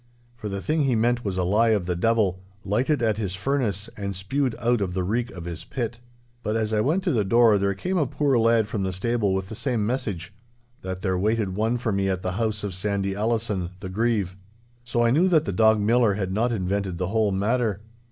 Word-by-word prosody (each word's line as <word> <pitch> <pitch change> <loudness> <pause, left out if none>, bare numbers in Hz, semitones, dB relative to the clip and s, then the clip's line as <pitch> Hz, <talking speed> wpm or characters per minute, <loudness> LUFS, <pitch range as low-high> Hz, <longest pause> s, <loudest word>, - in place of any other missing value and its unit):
For 110 -3 -6
the 100 -1 -4
thing 155 0 +1
he 130 -3 +2
meant 120 +2 +1
was 95 -3 -2
a 90 - +1
lie 105 +6 +3
of 90 - -5
the 90 0 -1
devil, 100 -1 +1 0.3
lighted 120 +7 +1
at 110 -2 +1
his 95 -4 -2
furnace 105 -4 -1
and 100 -1 -4
spewed 125 +7 -1
out 120 -1 +1
of 90 -2 -2
the 95 - 0
reek 115 +6 -1
of 90 -6 -9
his 85 -2 -6
pit. 120 -2 -4 0.4
But 110 -1 -2
as 110 -1 0
I 105 - +3
went 160 - +1
to 185 - +1
the 110 -5 +2
door 115 +1 +5
there 100 0 0
came 185 - -1
a 150 - +1
poor 140 -2 +1
lad 115 -1 +3
from 105 -2 -3
the 95 -1 -1
stable 105 0 0
with 95 0 -3
the - - -6
same 115 -2 -1
message—that 115 -2 -6
there 95 -2 0
waited 105 -1 0
one 110 +4 +1
for 115 -2 -1
me 100 -1 0
at 95 -1 -2
the 90 - -1
house 110 +1 -1
of 100 -2 -3
Sandy 100 +1 -1
Allison, 105 -4 -1
the 95 -1 -6
Grieve. 105 -2 0 0.5
So 120 -1 0
I 115 - +3
knew 165 +8 +4
that 165 -5 +3
the 100 - -2
dog 110 +3 +4
Millar 110 0 +3
had 95 -2 -2
not 115 +4 +1
invented 95 -3 -1
the 90 0 -2
whole 110 -1 +2
matter. 105 +1 0
110 Hz, 230 wpm, -25 LUFS, 95-120 Hz, 0.5 s, door